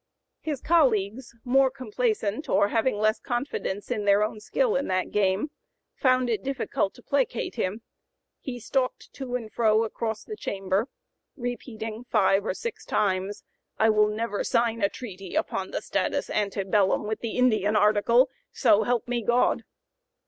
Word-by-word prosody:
His 295 -5 -4
colleagues, 240 - +2
more 265 +2 +4
complaisant 240 -1 -2
or 200 +1 +3
having 225 0 +1
less 215 +1 +2
confidence 240 -5 -3
in 215 -4 -1
their 200 +1 +5
own 215 0 -3
skill 485 - 0
in 275 - 0
that 185 0 -1
game, 200 +7 +1 0.4
found 255 -1 +2
it 225 -4 0
difficult 265 -7 -1
to 245 - -16
placate 270 -4 0
him; 205 +5 -3 0.6
he 245 -2 -6
"stalked 255 +3 -2
to 255 -3 -5
and 225 -3 -5
fro 220 -1 +3
across 220 -1 -3
the 430 - -7
chamber, 195 - -1 0.5
repeating 235 -3 -5
five 200 -4 +3
or - - -1
six 470 - -5
times, 195 0 -1 0.3
'I 220 - +4
will 210 0 +4
never 210 0 -2
sign 230 -1 +1
a 200 - +3
treaty 195 -7 -8
upon 190 - -1
the - - -4
status - - -1
ante 200 -1 0
bellum 195 +1 +2
with 215 +1 -2
the 230 0 -4
Indian 215 -4 +3
article. 215 +4 +4 0.2
So 205 - +4
help 240 +2 0
me 240 -1 -1
God!'" 240 +3 +2
220 Hz, 155 wpm, -26 LUFS, 205-250 Hz, 0.6 s, their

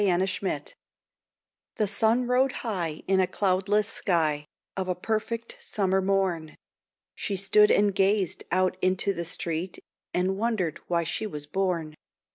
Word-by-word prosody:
MEG'S 185 0 +2
CURSE 485 - -3 1.0
The 215 - +1
sun 220 +4 +2
rode 250 +2 +3
high 175 -8 -2
in 190 0 +3
a 185 - +3
cloudless 200 +2 +1
sky 155 -8 0 0.3
Of 190 -1 -2
a 180 - +1
perfect 225 +4 -3
summer 190 -2 0
morn. 190 -5 0 0.6
She 200 - -3
stood 205 +2 +5
and 205 -1 +4
gazed 195 -1 +1
out 185 0 +2
into 185 +2 +2
the 170 -2 -4
street, 170 +1 -2 0.3
And 190 +2 0
wondered 215 -9 0
why 170 -1 +1
she 190 +6 -2
was 150 -7 -6
born. 170 -2 -1
190 Hz, 140 wpm, -27 LUFS, 175-210 Hz, 1.0 s, stood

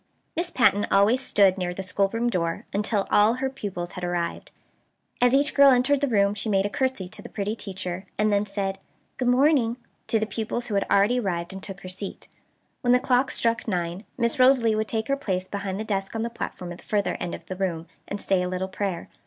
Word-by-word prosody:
Miss 340 +2 -1
Patten 205 - +3
always 205 +6 +4
stood 195 -6 +3
near 180 -1 -2
the 190 - -4
schoolroom 200 +5 0
door 170 -7 -1
until 205 0 0
all 210 +3 +5
her 265 +1 -2
pupils 190 -9 -5
had 180 - -8
arrived. 175 -1 -2 0.7
As 245 0 +5
each 285 +1 +2
girl 280 -1 +7
entered 265 +2 +3
the 285 - +2
room 200 -4 +3
she 215 +1 -4
made 195 -1 +2
a 205 - -2
curtsey 260 -9 -1
to - - -10
the - - -10
pretty 205 +1 -3
teacher, 190 -3 -6
and 215 0 +2
then 200 0 +3
said 195 -1 -3 0.4
"good 250 - -1
morning" 250 -2 +3 0.3
to 225 - +2
the 220 - 0
pupils 225 +3 -3
who - - -3
had 200 - +1
already 210 +6 +4
arrived, 180 -4 -2
and 190 - -7
took 195 0 -8
her 185 - -8
seat. 190 +2 -6 0.5
When 245 -2 +3
the 250 - +5
clock 255 +1 +2
struck 230 0 0
nine 175 -1 -2
Miss 235 +1 0
Rosalie 255 -3 +5
would 215 0 0
take 220 0 -2
her 275 - +2
place 190 -9 -2
behind 200 -1 -4
the - - -2
desk 195 -1 -3
on 225 - -1
the 235 - -3
platform 180 -6 -6
at 175 - -8
the - - -16
further 205 -3 0
end 175 - -3
of - - -12
the 185 - -5
room, 175 -4 -2 0.2
and 205 - -4
say 190 -2 +1
a 180 - -1
little 185 +1 -3
prayer. 190 -2 -3
205 Hz, 225 wpm, -25 LUFS, 190-240 Hz, 0.7 s, girl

